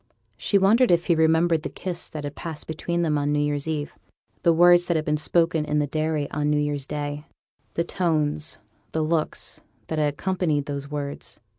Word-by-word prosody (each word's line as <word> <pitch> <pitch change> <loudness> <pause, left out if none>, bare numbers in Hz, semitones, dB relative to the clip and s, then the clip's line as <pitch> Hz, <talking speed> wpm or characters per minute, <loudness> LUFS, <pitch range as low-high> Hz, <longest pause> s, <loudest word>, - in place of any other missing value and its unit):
She 115 - +1
wondered 220 +6 +4
if 170 0 +3
he 170 - +3
remembered 160 0 +3
the - - -4
kiss 180 -2 -5
that 150 -2 -6
had 145 0 -4
passed 160 -3 -7
between 170 +2 -2
them 150 -3 +1
on 145 0 0
new 150 - +1
year's 145 0 0
eve 150 -2 -2 0.5
the 170 - +4
words 175 +1 +6
that 170 - +1
had 155 -1 0
been 150 - +1
spoken 165 +1 +2
in 150 0 -1
the 150 - +2
dairy 155 0 -1
on 150 0 0
new 150 - +2
year's 145 -2 -1
day; 145 0 -4 0.5
the 170 - +1
tones, 155 -4 0 0.4
the 160 - +1
looks, 155 0 -1 0.3
that 160 - -1
had 150 -1 +2
accompanied 170 -5 0
those 140 -1 -5
words. 145 -1 -5
155 Hz, 195 wpm, -24 LUFS, 145-170 Hz, 0.5 s, words